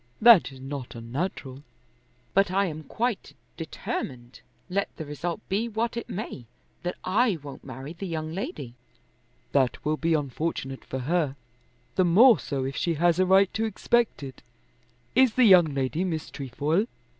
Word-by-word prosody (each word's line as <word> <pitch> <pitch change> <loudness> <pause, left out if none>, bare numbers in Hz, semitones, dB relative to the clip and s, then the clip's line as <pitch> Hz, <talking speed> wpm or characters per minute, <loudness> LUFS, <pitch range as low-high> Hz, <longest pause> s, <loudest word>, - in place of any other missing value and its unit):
"That 225 -10 +7
is 135 - -12
not 135 -2 -6
unnatural." 130 +3 -4 0.7
"But 195 0 +4
I 195 +2 +2
am 155 -3 -5
quite 240 -2 -2 0.2
determined, 130 -6 -6 0.3
let 195 +2 -1
the 160 - -5
result 165 +6 -4
be 215 +5 -1
what 230 +2 -2
it 235 - -5
may, 180 - -6 0.3
that 180 0 -3
I 210 +1 +2
won't 140 -2 -9
marry 130 +4 -8
the 190 +3 -6
young 160 -2 -4
lady." 145 -9 -5 0.8
"That 135 -1 +1
will 155 +1 +1
be 165 0 +1
unfortunate 140 -2 -3
for 130 - -5
her, 165 +5 +1
and 135 -1 -8 0.6
the 185 - +5
more 220 +8 +7
so 135 -2 -3
if 135 +1 -4
she 170 +2 0
has 170 +2 +2
a 185 - +3
right 190 +1 +5
to 225 - 0
expect 225 -3 0
it. 135 -1 -9 0.7
Is 260 -2 +4
the 255 - +5
young 185 -5 +8
lady 140 +3 -1
Miss 160 -4 -3
Trefoil?" 145 - -1
165 Hz, 165 wpm, -26 LUFS, 140-195 Hz, 0.8 s, young